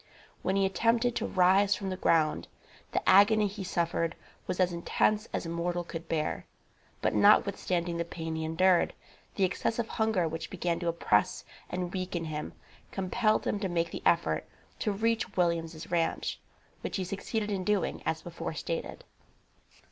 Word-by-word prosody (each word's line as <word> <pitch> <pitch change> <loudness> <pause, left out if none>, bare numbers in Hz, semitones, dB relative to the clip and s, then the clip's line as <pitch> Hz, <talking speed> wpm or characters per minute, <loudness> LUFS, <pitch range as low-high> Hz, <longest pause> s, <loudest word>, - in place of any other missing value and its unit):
When 190 - 0
he 195 0 +3
attempted 230 +5 +2
to - - -1
rise 190 +2 +4
from 195 -2 -4
the - - -2
ground, 160 -4 +2 0.4
the - - -1
agony 210 +2 +6
he 200 0 -4
suffered 170 -2 -1 0.3
was 185 - -3
as 180 -1 +3
intense 210 +5 +1
as - - -2
mortal 170 +1 -2
could 165 -1 -8
bear; 155 -2 -1 0.6
but - - +2
notwithstanding 170 -1 +3
the 170 - 0
pain 165 -1 -5
he 160 - -2
endured, 175 +3 +3 0.4
the 195 - +1
excessive 225 +5 0
hunger 220 -8 +1
which 160 0 -5
began 175 -2 -1
to 170 - -3
oppress 170 0 +1 0.2
and 180 0 -3
weaken 180 -3 -3
him, 150 -1 -4 0.4
compelled 215 +3 +1
him 205 - 0
to 195 -2 -2
make 170 -1 0
the - - -5
effort 80 - +2 0.3
to 210 - 0
reach 225 0 -1
Williams' 170 -2 -1
ranche, 170 -1 0 0.4
which - - -3
he 190 - -1
succeeded 205 +3 -3
in 190 -2 -1
doing, 210 +1 0
as - - -2
before - - -5
stated. - - -4
180 Hz, 160 wpm, -30 LUFS, 170-200 Hz, 0.6 s, agony